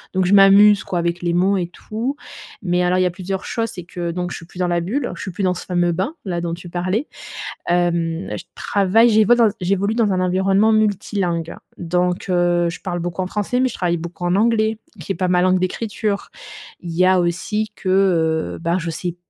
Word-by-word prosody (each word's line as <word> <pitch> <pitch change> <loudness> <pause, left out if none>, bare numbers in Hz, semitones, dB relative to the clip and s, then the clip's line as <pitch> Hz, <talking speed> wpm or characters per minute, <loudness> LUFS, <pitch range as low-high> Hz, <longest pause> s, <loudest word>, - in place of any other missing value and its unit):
donc 190 - +2
je 185 - +2
m'amuse, 200 +1 +7
quoi, 180 - -3
avec 170 0 -1
les 175 -1 0
mots 190 +3 +2
et 175 -2 -1
tout. 225 +9 -5 0.5
Mais 180 -1 +1
alors, 180 +1 +2
il 185 - +3
y - - +2
a 180 - +1
plusieurs 190 +1 -5
choses, 230 -1 -2
c'est 180 - -7
que 175 0 -5
donc 180 +1 -3
je - - -5
suis 165 - -12
plus 175 - -15
dans 180 -1 0
la 175 -1 0
bulle, 245 +10 -2
je - - -9
suis - - -5
plus 190 +2 -4
dans 180 -1 +2
ce 180 - -7
fameux 175 -1 +1
bain-là 185 - -3
dont 170 -1 -3
tu 175 +1 -11
parlais. 185 - -2 0.6
Hem, 170 0 0
je - - -8
travaille, 205 +4 +3
j'évol 220 +1 +4
j'évolue 200 +4 0
dans 225 -4 +2
un 185 - 0
environnement 190 +4 +2
multilingue. 195 -5 0 0.2
Donc 180 +2 -1
heu, 175 -1 +2
je 170 - -7
parle 175 -3 -3
beaucoup 175 +2 -3
en - - -4
français, 210 +6 -1
mais 260 - +3
je - - -8
travaille 175 -2 0
beaucoup 170 +2 -6
en 175 +1 +2
anglais, 220 +1 +2 0.2
qui 165 - -5
est - - -8
pas 185 - -1
ma 180 0 +3
langue 185 0 +3
d'écriture. 205 +2 -2 0.5
Il 175 - -6
y 170 +2 +2
a 185 0 +4
aussi 185 +5 -1
que, 190 - -4
heu, 170 -4 +1
ben, 170 +1 0
je 165 -2 -3
sais 175 +1 -4
185 Hz, 225 wpm, -20 LUFS, 175-200 Hz, 0.6 s, m'amuse